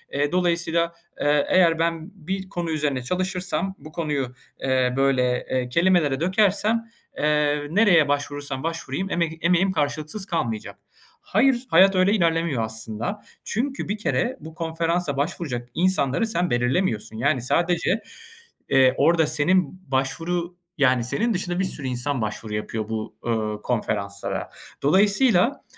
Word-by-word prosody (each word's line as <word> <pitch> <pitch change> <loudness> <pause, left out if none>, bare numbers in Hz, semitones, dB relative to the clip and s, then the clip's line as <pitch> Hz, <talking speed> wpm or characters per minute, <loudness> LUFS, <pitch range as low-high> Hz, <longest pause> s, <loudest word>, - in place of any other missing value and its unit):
ııı, 145 +1 +1
dolayısıyla, 170 -1 +1 0.3
ııı, 145 0 +3
"Eğer 170 -3 +4
ben 165 +2 -1 0.2
bir 190 0 -3
konu 175 -3 -3
üzerine 145 -5 -1
çalışırsam, 185 +4 -2
bu 155 - -12
konuyu, 145 -6 -2 0.3
eee, 130 -1 +1
böyle, 130 -2 +2
eee, 125 -1 0
kelimelere 165 -2 +2
dökersem, 210 +5 +1 0.3
eee, 150 -1 +1
nereye 180 -6 +5
başvurursam 145 -1 -2
başvurayım 165 +2 -3
emek 165 -2 -1
emeğim 180 +2 +3
karşılıksız 155 +4 -2
kalmayacak." 120 - -3 0.4
Hayır, 255 -2 +2
hayat 190 +3 +6
öyle 185 +2 +4
ilerlemiyor 165 - +1
aslında. 110 - -4 0.2
Çünkü 265 0 -2
bir 205 - -1
kere 245 +4 -1
bu 160 0 -11
konferansa 165 -2 -1
başvuracak 140 -5 -3
insanları 180 - +2
sen 180 -5 0
belirlemiyorsun. 120 - 0
Yani 135 +2 +1
sadece, 175 - +1 0.7
eee, 130 -1 +5
orada 165 -2 +4
senin 175 +4 +1
başvuru 170 +6 -1 0.2
yani 130 -3 +3
senin 230 - 0
dışında 180 -1 -2
bir - - +2
sürü 145 -7 -4
insan 125 +1 -2
başvuru 110 0 -4
yapıyor 110 0 -4
bu, 110 -1 -4
ııı, 110 -2 -1
konferanslara. 100 -4 -2 0.3
Dolayısıyla, 205 - +3
160 Hz, 130 wpm, -24 LUFS, 130-185 Hz, 0.7 s, hayat